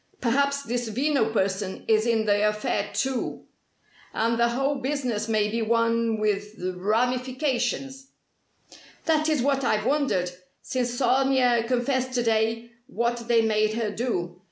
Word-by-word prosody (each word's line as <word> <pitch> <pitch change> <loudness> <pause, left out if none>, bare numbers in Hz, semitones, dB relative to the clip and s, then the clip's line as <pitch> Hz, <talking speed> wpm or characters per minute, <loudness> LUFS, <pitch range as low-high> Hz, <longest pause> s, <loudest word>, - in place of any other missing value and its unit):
Perhaps 280 +3 +1
this 240 -1 -2
Veno 255 -1 +1
person 190 -2 -2
is 220 +1 +3
in 225 -2 +2
the 205 0 +3
affair, 210 -1 -2
too. 265 -2 -2 0.7
And 230 +1 +1
the 235 - +4
whole 270 +4 0
business 255 -5 -2
may 215 -1 +2
be 230 +2 -2
one 230 0 +1
with 210 0 -1 0.2
ramifications." 250 +5 -1 1.0
"That 315 -1 +2
is 300 -6 +1
what 275 0 +1
I've 215 -3 +1
wondered 265 -11 +1 0.3
since 245 -1 -2
Sonia 250 -2 +3
confessed 255 +1 0
to 245 -1 +1
day 225 +1 0 0.2
what 235 -2 -2
they 230 -1 +4
made 215 -1 +2
her 225 -2 -1
do. 180 -7 -3
235 Hz, 135 wpm, -25 LUFS, 215-260 Hz, 1.0 s, the